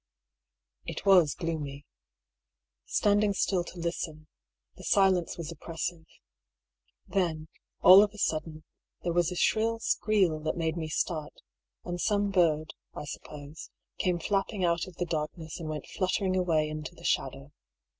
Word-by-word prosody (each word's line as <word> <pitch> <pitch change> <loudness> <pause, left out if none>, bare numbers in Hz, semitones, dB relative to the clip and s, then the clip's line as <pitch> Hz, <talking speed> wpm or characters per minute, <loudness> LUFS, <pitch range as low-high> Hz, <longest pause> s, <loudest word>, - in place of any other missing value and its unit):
It - - -5
was 180 -7 +6
gloomy. 145 -4 -4 1.0
Standing 205 0 +3
still 185 -2 +1
to 180 - -10
listen, 165 -2 -4 0.5
the - - -13
silence 190 -5 +3
was 165 -1 -5
oppressive. 165 0 -5 1.0
Then, 160 -5 -1 0.3
all 185 +2 +10
of 210 - +3
a 210 - -14
sudden, 155 -3 -2 0.4
there 170 - 0
was 175 0 +2
a - - -4
shrill 225 +5 +2
skreel 205 -7 +1
that 155 - -1
made 160 -1 0
me 165 -2 -3
start; 155 -1 -3 0.4
and 175 0 -3
some 205 -1 +1
bird, 155 -4 +2 0.2
I - - -5
suppose, 145 +1 -9 0.3
came 180 -1 +1
flapping 195 +2 0
out 170 +1 +1
of 185 - -12
the 175 - -2
darkness 160 0 -4
and 160 -2 -5
went 150 -2 -4
fluttering 185 0 0
away 165 -4 +2
into 155 +2 -6
the 170 - -15
shadow. 135 +2 -1
170 Hz, 145 wpm, -29 LUFS, 155-185 Hz, 1.0 s, all